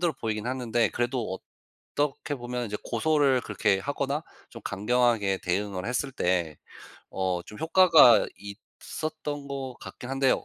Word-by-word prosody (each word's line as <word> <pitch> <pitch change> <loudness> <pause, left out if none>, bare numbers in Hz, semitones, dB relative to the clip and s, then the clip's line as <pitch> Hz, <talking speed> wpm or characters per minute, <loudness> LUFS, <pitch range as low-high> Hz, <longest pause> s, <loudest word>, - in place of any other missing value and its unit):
힘들어 175 -2 +2
보이기는 110 -2 -3
하는데 120 -3 +1
그래도 120 -5 -2 0.6
어떻게 145 0 -1
보면 125 0 -4
인제 105 -2 -4
고소를 140 +1 +2
그렇게 100 -3 +1
하거나 140 +3 -2 0.3
좀 115 - -11
강경하게 105 -1 +1
대응을 95 +1 -2
했을 125 +3 -2
때 90 - 0 0.6
어 95 -2 -1
좀 105 - -11
효과가 165 -7 +6
있었던 145 +7 -7
것 135 -2 -5
같긴 125 - -9
한데요. 135 -1 +2
120 Hz, 310 characters per minute, -27 LUFS, 105-140 Hz, 0.6 s, 효과가